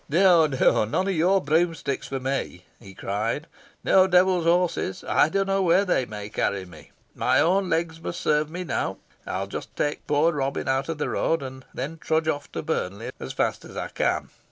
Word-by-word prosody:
"No, 170 0 +5
no 135 -5 +3
none 115 - -1
of - - +1
your 180 +4 +3
broomsticks 160 -2 0
for 135 - -3
me," 130 -9 -3
he 95 -1 -13
cried; 110 - -2 0.4
"no 190 0 +5
devil's 180 -1 +3
horses 170 - +1
I - - +4
don't 195 +4 +1
know 195 0 +1
where 185 +2 +4
they 135 -9 +1
may 105 -1 -6
carry 100 -2 -1
me. 80 -4 -14 0.2
My - - +2
own 185 +3 +2
legs 165 -1 -1
must 170 - -5
serve 150 0 +1
me 180 +3 -5
now. 160 - -2 0.3
I'll - - -2
just - - -7
take 145 - -2
poor 150 +3 +3
Robin 140 -3 -2
out 135 +2 0
of 165 - -2
the 150 - -2
road, 165 -3 0
and 130 0 -8
then 150 +6 -5
trudge 160 0 0
off 145 -2 -2
for - - -4
Burnley 100 +5 -3
as - - -6
fast - - -1
as - - -11
I - - -3
can." - - -1
155 Hz, 200 wpm, -25 LUFS, 130-175 Hz, 0.4 s, No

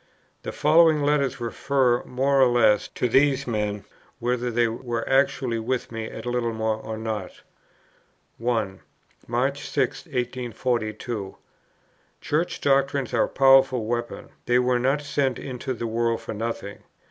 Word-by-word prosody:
The - - -5
following 155 0 +4
letters 140 -3 +1
refer, 125 +1 +1
more 135 +2 +1
or 130 - +7
less, 115 -4 +3
to 125 - +1
these 135 +3 +3
men, 105 -3 -2 0.3
whether 125 +1 -1
they 120 0 +2
were 115 0 -4
actually 135 -3 +1
with 125 +2 -2
me 115 -1 -4
at - - -8
Littlemore 115 -3 -1
or 110 0 -6
not: 110 -4 -5 1.0
1. 110 -5 -1 0.5
"March 130 +4 -1
6, 135 +2 -1
1842. 120 -5 -3 0.8
Church 160 +4 -1
doctrines 135 -1 +1
are - - +3
a - - -9
powerful 135 -3 +4
weapon; 120 +1 -4 0.2
they 120 - +4
were 125 0 +2
not 135 +4 +1
sent 140 -3 0
into 130 0 -5
the 120 -2 -3
world 115 0 0
for - - -6
nothing. 110 -2 -5
125 Hz, 135 wpm, -24 LUFS, 115-135 Hz, 1.0 s, or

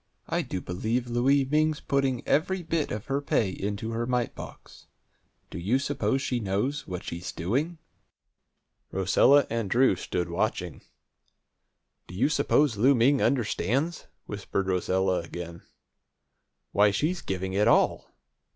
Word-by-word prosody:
I - - 0
do 95 - -5
believe 110 +9 -2
Louie 135 +3 +3
Ming's 155 +2 +1
putting 135 -3 -1
every 180 +4 +1
bit 165 -1 -1
of 105 0 -4
her 140 +1 -1
pay 110 -8 +1
into 105 +4 -4
her 115 +1 -2
mite 125 -2 0
box! - - -12 0.6
Do - - -6
you 105 +9 +1
suppose 135 -1 -1
she 125 -3 -1
knows 110 +8 -2
what 90 -1 -5
she's 85 +2 -5
doing?" 135 - -2 1.1
Rosella 125 +9 +4
and 115 -3 -2
Drew 125 -3 +4
stood 90 -1 -3
watching. 85 0 -2 1.3
"Do 90 - -10
you 115 +9 +2
suppose 145 -4 +2
Louie 130 +6 +5
Ming 130 +4 +3
understands?" 135 - 0 0.2
whispered 100 -1 -3
Rosella 95 0 +1
again. 85 0 -7 1.1
"Why, 105 +1 +4
she's 155 - -1
giving 95 0 -3
it 105 +2 +2
all! - - +3
115 Hz, 135 wpm, -27 LUFS, 95-140 Hz, 1.3 s, Louie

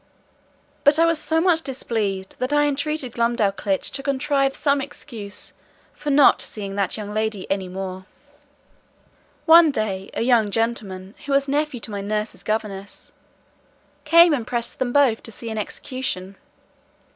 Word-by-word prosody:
But 290 +1 +5
I 330 - +5
was 335 -2 +2
so 320 +1 +1
much 335 -1 +3
displeased, 215 -9 -3
that 255 +2 -2
I 295 0 +4
entreated 290 -2 -1
Glumdalclitch 210 -4 0
to 275 - -4
contrive 275 0 0
some 280 -1 +2
excuse 230 -7 -7 0.4
for 295 0 -5
not 285 -1 +6
seeing 200 -2 -5
that 200 0 0
young 210 -1 -6
lady 215 -2 -2
any 195 -1 -1
more. 185 0 -6 1.4
One 330 0 +8
day, 200 -7 -2
a - - 0
young 235 -4 +3
gentleman, 205 -4 -2
who 280 - 0
was 275 0 +3
nephew 290 -2 -1
to 215 - -8
my 200 -1 -4
nurse's 210 +2 -3
governess, 205 -2 -4 0.9
came 335 +2 +7
and 240 -6 -2
pressed 235 -1 -3
them 250 -2 0
both 260 -5 +3
to 225 - -8
see 225 +1 -7
an 220 - -3
execution. 200 -4 -5
235 Hz, 150 wpm, -22 LUFS, 200-285 Hz, 1.4 s, One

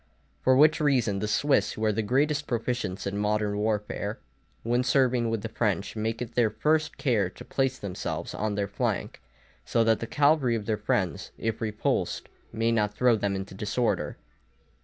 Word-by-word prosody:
For 130 - +4
which 155 +2 +6
reason 125 -9 +2
the 105 - -2
Swiss, 140 +6 +2
who 110 - -2
are 110 - +3
the 110 +2 0
greatest 145 +6 +1
proficients 120 -5 -2
in 100 +1 -2
modern 105 0 0
warfare, 105 0 -2 0.5
when 120 +2 +1
serving 125 -3 +2
with 115 -2 -2
the 115 - -3
French, 105 -4 -1
make 110 +2 -2
it 120 - -10
their 120 -3 +3
first 155 +7 0
care 115 - +1
to - - -12
place 135 -1 0
themselves 100 -6 -4
on 105 -1 -2
their 100 -1 -1
flank, - - -2 0.4
so 115 - +2
that 110 -1 +3
the 115 - -4
cavalry 145 -4 +3
of 110 -2 -4
their 110 - +1
friends, - - -1
if 115 0 -3
repulsed, 110 -1 -1 0.2
may 115 +1 +1
not 105 -2 +1
throw 125 0 +4
them 100 -2 -1
into 95 0 -5
disorder. 105 +5 -1
115 Hz, 180 wpm, -27 LUFS, 105-125 Hz, 0.5 s, which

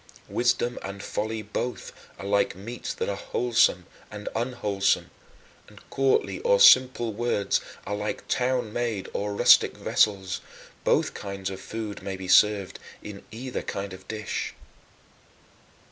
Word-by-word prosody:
Wisdom 120 0 +1
and 100 0 -7
folly 110 +1 -3
both 120 +4 -4 0.2
are - - -8
like 100 -2 +1
meats 115 +6 -6
that - - -3
are 100 - -1
wholesome 115 -6 +1 0.2
and 105 -1 -6
unwholesome, 110 -5 0 0.6
and - - -17
courtly 135 0 +1
or - - +3
simple 130 - +6
words 105 -3 0 0.2
are - - -3
like 105 +1 -4
town 125 -4 0
made 115 -5 -2
or 105 0 -2
rustic - - +5
vessels 95 -3 +1 0.4
both - - +2
kinds 100 -1 -5
of 95 - -7
food 110 -2 -6
may 95 - -4
be 95 -1 -7
served 100 0 +4 0.2
in 100 -1 -9
either 125 +3 -5
kind 100 -1 -5
of 95 0 -12
dish. 110 -1 -4
105 Hz, 135 wpm, -26 LUFS, 100-120 Hz, 0.6 s, simple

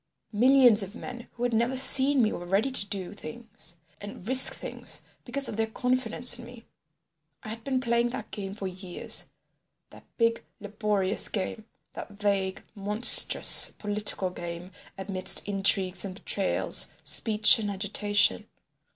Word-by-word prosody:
Millions 245 -1 +3
of 195 +2 -9
men 245 -1 -11
who 240 - -9
had 245 -1 -3
never 235 +4 -2
seen 265 0 +4
me 215 - -1
were 175 - -9
ready 195 +9 -2
to 205 -6 -3
do 195 -2 -8
things 225 -7 -12 0.3
and 205 -1 -12
risk 260 +1 +5
things - - -7 0.2
because 270 +2 0
of 210 - -8
their 225 0 -2
confidence 250 +1 -2
in 240 - -12
me. 240 -1 -16 0.8
I - - -10
had 225 +1 -10
been 260 0 -3
playing 235 -1 -2
that 225 -2 -10
game 195 -2 -8
for 205 - -9
years, 185 -1 -5 0.6
that - - -17
big 230 -1 -2 0.2
laborious 205 -1 -1
game, 210 +2 -7 0.3
that - - -10
vague, 200 -2 -4
monstrous 210 +4 +7
political 205 -3 -2
game 175 +1 -10 0.3
amidst 190 0 -1
intrigues 195 -2 +1
and 190 -2 -9
betrayals, 195 0 -1 0.2
speech 220 +2 +1
and 210 -2 -5
agitation. 205 +1 -2
210 Hz, 145 wpm, -24 LUFS, 195-240 Hz, 0.8 s, monstrous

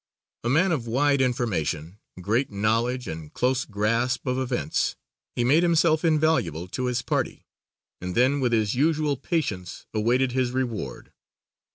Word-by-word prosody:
A 120 - 0
man 170 +8 +3
of 130 -8 -1
wide 140 +3 +2
information, 100 - -1 0.2
great 115 +9 0
knowledge 115 +5 0
and 80 -1 -7
close 130 +1 0
grasp 115 +4 0
of 130 0 0
events 130 -1 -1 0.4
he 120 - +1
made 145 +7 +4
himself 165 -2 +3
invaluable 155 - +1
to 130 +7 -3
his 125 0 -1
party - - -2 0.6
and 90 0 -4
then 130 +4 +3
with 125 -3 +1
his 110 -3 +2
usual 150 +1 +1
patience 125 - -3
awaited 120 +4 +2
his 125 -1 0
reward. 115 - -3
125 Hz, 145 wpm, -25 LUFS, 105-140 Hz, 0.6 s, made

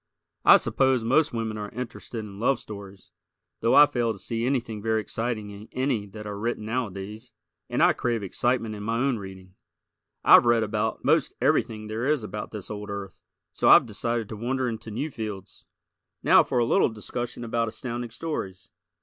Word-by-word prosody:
I - - +9
suppose 130 -3 +1
most 150 +7 +3
women 110 -2 -3
are 105 -1 -5
interested 115 -1 -6
in 100 -1 -10
love 130 +4 +2
stories, 100 -2 -11 0.5
though 115 - +3
I 145 - +10
fail 120 -5 -1
to - - -11
see 115 +3 -4
anything 120 -5 -1
very 110 +1 +1
exciting 110 -1 -3
in 100 +2 -11
any 130 -6 -1
that 105 +2 -10
are 105 -1 -5
written 115 -1 -2
nowadays; 110 0 -4 0.4
and - - +1
I - - +6
crave 115 -3 -1
excitement 115 +3 0
in 105 - -7
my 115 +5 0
reading. 95 -5 -7 0.7
I've - - +8
read 120 -1 +4
about 110 +1 -2
most - - +2
everything 110 -1 +1
there 110 +4 -3
is 150 -5 +1
about 105 0 -5
this 105 -2 -8
old 105 -1 -6
earth, 100 -2 -6 0.3
so - - +2
I've - - +8
decided 115 +1 -2
to 110 - -5
wander 125 +4 -1
into 115 -1 -5
new 145 +9 -3
fields. 105 -5 -7 0.6
Now - - +7
for - - -2
a 120 - +3
little - - +3
discussion 120 +3 -5
about 115 0 -1
Astounding 120 +2 -5
Stories. 110 - -5
110 Hz, 180 wpm, -26 LUFS, 105-120 Hz, 0.7 s, I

